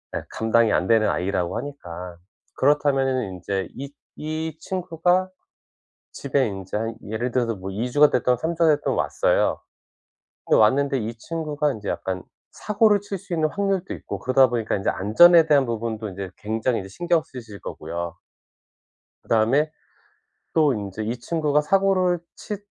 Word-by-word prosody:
예 -, -, -2 dB
감당이 110 Hz, 0 st, +2 dB
안 90 Hz, -, +2 dB
되는 110 Hz, -1 st, +4 dB
아이라고 90 Hz, -1 st, -1 dB
하니까. 90 Hz, -11 st, -7 dB, 0.4 s
그렇다면은 135 Hz, -5 st, +2 dB
인제 95 Hz, +1 st, -3 dB
이 140 Hz, +1 st, -7 dB, 0.2 s
이 155 Hz, 0 st, -4 dB
친구가 180 Hz, +1 st, 0 dB, 0.8 s
집에 140 Hz, -2 st, 0 dB
인제 95 Hz, -1 st, -5 dB
한 115 Hz, +1 st, -3 dB, 0.2 s
예를 120 Hz, +3 st, -2 dB
들어서 120 Hz, -2 st, 0 dB
뭐 95 Hz, +1 st, -7 dB
2 115 Hz, +6 st, -3 dB
주가 145 Hz, +2 st, +6 dB
됐든 125 Hz, 0 st, +2 dB
3 160 Hz, +5 st, -2 dB
주가 165 Hz, -2 st, +4 dB
됐든 145 Hz, -, -1 dB
왔어요. -, -, +1 dB, 0.9 s
근데 -, -, +3 dB
왔는데 135 Hz, +5 st, +3 dB
이 115 Hz, 0 st, -3 dB
친구가 150 Hz, 0 st, -2 dB
인제 105 Hz, -4 st, -7 dB
약간 95 Hz, -1 st, -3 dB, 0.3 s
사고를 210 Hz, -1 st, +2 dB
칠 200 Hz, -1 st, -5 dB
수 175 Hz, -, -6 dB
있는 155 Hz, -2 st, +1 dB
확률도 195 Hz, -1 st, -1 dB
있고 -, -, -7 dB
그러다 130 Hz, +1 st, +5 dB
보니까 115 Hz, -2 st, -1 dB
인제 95 Hz, -, 0 dB
안전에 165 Hz, -, +6 dB
대한 145 Hz, -4 st, +4 dB
부분도 115 Hz, -2 st, -3 dB
이제 95 Hz, 0 st, -6 dB
굉장히 110 Hz, +3 st, -1 dB
이제 95 Hz, -, -9 dB
신경 170 Hz, -, +1 dB
쓰실 115 Hz, -6 st, -10 dB
거고요. 85 Hz, 0 st, -6 dB, 1.1 s
그다음에 125 Hz, +8 st, +2 dB, 0.8 s
또 155 Hz, -4 st, +4 dB
인제 105 Hz, -1 st, -5 dB
이 115 Hz, +3 st, -3 dB
친구가 150 Hz, +1 st, +1 dB
사고를 185 Hz, +1 st, +2 dB, 0.2 s
치 210 Hz, -2 st, -6 dB
130 Hz, 310 characters per minute, -23 LUFS, 110-160 Hz, 1.1 s, 주가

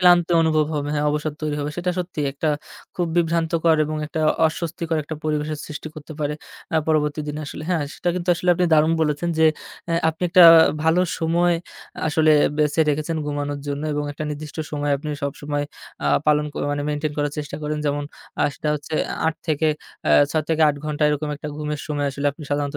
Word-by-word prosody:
ক্লান্ত 175 Hz, -1 st, +6 dB
অনুভব 155 Hz, -1 st, +2 dB
হবে, 145 Hz, -1 st, -2 dB
হ্যাঁ 150 Hz, 0 st, 0 dB
অবসাদ 150 Hz, +1 st, -2 dB
তৈরি 150 Hz, -1 st, -1 dB
হবে। 145 Hz, +1 st, -2 dB
সেটা 180 Hz, +1 st, -1 dB
সত্যি 175 Hz, -3 st, -4 dB
একটা 150 Hz, +3 st, -2 dB, 0.5 s
খুব 175 Hz, -1 st, 0 dB
বিভ্রান্তকর 165 Hz, -1 st, +2 dB
এবং 155 Hz, +1 st, -3 dB
একটা 160 Hz, +1 st, -3 dB, 0.3 s
অস্বস্তিকর 165 Hz, 0 st, -3 dB
একটা 155 Hz, +2 st, -6 dB
পরিবেশের 155 Hz, 0 st, -1 dB
সৃষ্টি 155 Hz, 0 st, -7 dB
করতে 155 Hz, 0 st, -9 dB
পারে, 150 Hz, 0 st, -1 dB, 0.4 s
অ্যা 160 Hz, -, +2 dB
পরবর্তী 150 Hz, -1 st, +1 dB
দিনে 150 Hz, +1 st, -4 dB
আসলে 150 Hz, -, -7 dB
হ্যাঁ, 160 Hz, -5 st, +1 dB
সেটা -, -, -2 dB
কিন্তু 180 Hz, 0 st, -4 dB
আসলে 180 Hz, +1 st, -4 dB
আপনি 180 Hz, -, +1 dB
দারুণ 155 Hz, +1 st, +4 dB
বলেছেন, 150 Hz, +2 st, 0 dB
যে 160 Hz, -, +6 dB, 0.4 s
অ্যা 165 Hz, -1 st, 0 dB
আপনি 160 Hz, +2 st, -4 dB
একটা 180 Hz, 0 st, +8 dB, 0.4 s
ভালো 160 Hz, +2 st, +4 dB, 0.2 s
সময় 170 Hz, +2 st, +2 dB, 0.5 s
আসলে 155 Hz, +1 st, +4 dB, 0.3 s
বেছে 150 Hz, +1 st, +2 dB
রেখেছেন 155 Hz, +3 st, -1 dB
ঘুমানোর 145 Hz, 0 st, -2 dB
জন্য। 145 Hz, +1 st, -3 dB
এবং 145 Hz, 0 st, -1 dB
একটা 155 Hz, -, -5 dB
নির্দিষ্ট 150 Hz, +1 st, -7 dB
সময় 145 Hz, -1 st, -1 dB
আপনি 150 Hz, +2 st, -7 dB
সবসময় 145 Hz, +1 st, -2 dB, 0.4 s
আ -, -, +1 dB, 0.2 s
পালন 150 Hz, 0 st, +3 dB
করা -, -, -3 dB
মানে 145 Hz, 0 st, -2 dB
মেইনটেইন 150 Hz, 0 st, -1 dB
করার 145 Hz, -1 st, 0 dB
চেষ্টা 145 Hz, -1 st, -5 dB
করেন। 150 Hz, 0 st, -2 dB
যেমন 145 Hz, 0 st, 0 dB, 0.4 s
আ -, -, +4 dB
সেটা 150 Hz, -, -3 dB
হচ্ছে 150 Hz, +1 st, -5 dB, 0.3 s
৮ 160 Hz, -, +1 dB
থেকে 155 Hz, 0 st, +1 dB, 0.4 s
অ্যা -, -, +3 dB, 0.2 s
৬ 155 Hz, -1 st, 0 dB
থেকে 160 Hz, -1 st, +2 dB
৮ 145 Hz, -, 0 dB
ঘন্টা 150 Hz, 0 st, -2 dB
এরকম 150 Hz, +1 st, -1 dB
একটা 150 Hz, +1 st, -6 dB
ঘুমের 150 Hz, -1 st, -3 dB
সময় 145 Hz, -2 st, -1 dB
আসলে 140 Hz, +1 st, -3 dB
আপনি 150 Hz, -, -12 dB
সাধারণত 145 Hz, 0 st, -1 dB
150 Hz, 195 wpm, -22 LUFS, 145-160 Hz, 0.5 s, একটা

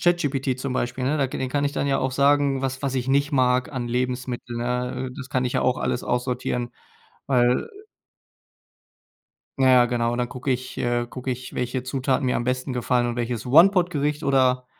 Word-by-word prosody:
ChatGPT 140 Hz, -7 st, +1 dB
zum 135 Hz, 0 st, -3 dB
Beispiel, 125 Hz, 0 st, -2 dB
ne, 150 Hz, +4 st, +1 dB
da 135 Hz, -, +2 dB
dem 130 Hz, 0 st, -3 dB
kann 145 Hz, +1 st, 0 dB
ich 140 Hz, -, 0 dB
dann 140 Hz, -, -1 dB
ja 135 Hz, -1 st, +1 dB
auch 130 Hz, 0 st, 0 dB
sagen, 140 Hz, 0 st, +2 dB
was 130 Hz, +1 st, -3 dB
was 135 Hz, -1 st, -1 dB
ich 125 Hz, +1 st, -2 dB
nicht 140 Hz, +2 st, +2 dB
mag 125 Hz, 0 st, +2 dB
an 125 Hz, -3 st, -3 dB
Lebensmitteln, 125 Hz, -1 st, -3 dB
ne? 125 Hz, +1 st, -2 dB
Äh, -, -, -12 dB
das 130 Hz, -2 st, -7 dB
kann 130 Hz, 0 st, 0 dB
ich 125 Hz, -, -1 dB
ja -, -, +2 dB
auch 125 Hz, -1 st, +1 dB
alles -, -, -1 dB
aussortieren, 125 Hz, 0 st, -2 dB, 0.6 s
weil 125 Hz, -2 st, +2 dB, 1.9 s
Ja 130 Hz, -1 st, +4 dB
ja, 125 Hz, -1 st, +6 dB
genau. 120 Hz, -1 st, 0 dB
Und 120 Hz, -, -3 dB
dann 125 Hz, 0 st, -1 dB
gucke 130 Hz, +2 st, -4 dB
ich, 130 Hz, 0 st, -3 dB
äh 120 Hz, 0 st, 0 dB
gucke 130 Hz, +1 st, -5 dB
ich, 125 Hz, +1 st, -6 dB
welche 125 Hz, +1 st, -2 dB
Zutaten 130 Hz, +1 st, -1 dB
mir 125 Hz, -, +1 dB
am 120 Hz, -, -2 dB
besten 130 Hz, +1 st, -2 dB
gefallen 125 Hz, 0 st, +1 dB
und 120 Hz, -, -3 dB
welches 120 Hz, 0 st, -3 dB
One-Pot-Gericht 160 Hz, -1 st, +4 dB
oder 130 Hz, -2 st, +2 dB
130 Hz, 200 wpm, -24 LUFS, 125-135 Hz, 1.9 s, ja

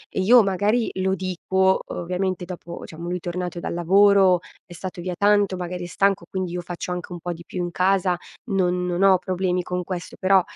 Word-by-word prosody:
io 225 Hz, +5 st, +6 dB
magari 205 Hz, +5 st, +1 dB
lo 190 Hz, 0 st, 0 dB
dico, 190 Hz, 0 st, +1 dB
ovviamente 180 Hz, +1 st, -2 dB
dopo 175 Hz, -1 st, -8 dB
diciamo 165 Hz, +2 st, -8 dB
lui 180 Hz, +1 st, -2 dB
tornato 175 Hz, 0 st, -4 dB
dal -, -, -3 dB
lavoro 190 Hz, +1 st, +5 dB, 0.3 s
è 175 Hz, -, -12 dB
stato 180 Hz, +1 st, -7 dB
via 180 Hz, +1 st, -3 dB
tanto, 205 Hz, -1 st, +3 dB
magari 180 Hz, 0 st, -5 dB
è -, -, -6 dB
stanco 195 Hz, +2 st, +1 dB
quindi 185 Hz, -2 st, -3 dB
io 180 Hz, 0 st, -3 dB
faccio 175 Hz, +1 st, -6 dB
anche 180 Hz, 0 st, -5 dB
un 175 Hz, -, -6 dB
po' 175 Hz, +2 st, -4 dB
di 170 Hz, 0 st, -8 dB
più 180 Hz, -, -5 dB
in 175 Hz, -, -2 dB
casa 185 Hz, 0 st, +2 dB, 0.3 s
non 180 Hz, -2 st, +1 dB
non 180 Hz, +1 st, 0 dB
ho 195 Hz, -1 st, +6 dB
problemi 180 Hz, 0 st, -1 dB
con 180 Hz, +1 st, -3 dB
questo 180 Hz, 0 st, -6 dB
però, 190 Hz, 0 st, +5 dB
180 Hz, 200 wpm, -23 LUFS, 175-190 Hz, 0.3 s, io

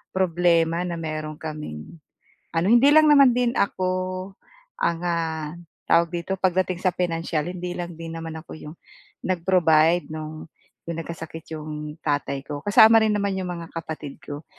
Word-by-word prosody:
problema 170 Hz, -2 st, +2 dB
na 170 Hz, -, -3 dB
meron 155 Hz, -1 st, -4 dB
kaming 150 Hz, -, -7 dB, 0.6 s
ano, 165 Hz, +3 st, +2 dB
hindi 240 Hz, +4 st, +6 dB
lang 310 Hz, 0 st, +7 dB
naman 275 Hz, -4 st, +7 dB
din 245 Hz, -1 st, +2 dB
ako 185 Hz, 0 st, -1 dB, 0.5 s
ang, 170 Hz, -1 st, 0 dB
ah, 160 Hz, -3 st, -2 dB, 0.4 s
tawag 170 Hz, 0 st, +5 dB
dito 175 Hz, +2 st, -2 dB
pagdating 185 Hz, -1 st, +1 dB
sa 185 Hz, -2 st, +1 dB
pinansiyal, 165 Hz, -3 st, -1 dB
hindi 180 Hz, 0 st, -5 dB
lang 175 Hz, -1 st, -5 dB
din 165 Hz, 0 st, -7 dB
naman 165 Hz, -1 st, -6 dB
ako -, -, -12 dB
'yong 150 Hz, +2 st, -10 dB, 0.5 s
nag-provide 170 Hz, -2 st, +3 dB
nung 155 Hz, 0 st, -7 dB, 0.4 s
yung 165 Hz, -1 st, -3 dB
nagkasakit 165 Hz, -1 st, -8 dB
yung 150 Hz, 0 st, -7 dB
tatay 145 Hz, -2 st, -1 dB
ko. 145 Hz, 0 st, -6 dB
Kasama 220 Hz, +4 st, +7 dB
rin 220 Hz, -, +3 dB
naman 200 Hz, -1 st, 0 dB
yung 185 Hz, -, -4 dB
mga 170 Hz, -2 st, -7 dB
kapatid 155 Hz, -3 st, -7 dB
ko. 145 Hz, +1 st, -8 dB
170 Hz, 150 wpm, -24 LUFS, 155-185 Hz, 0.6 s, lang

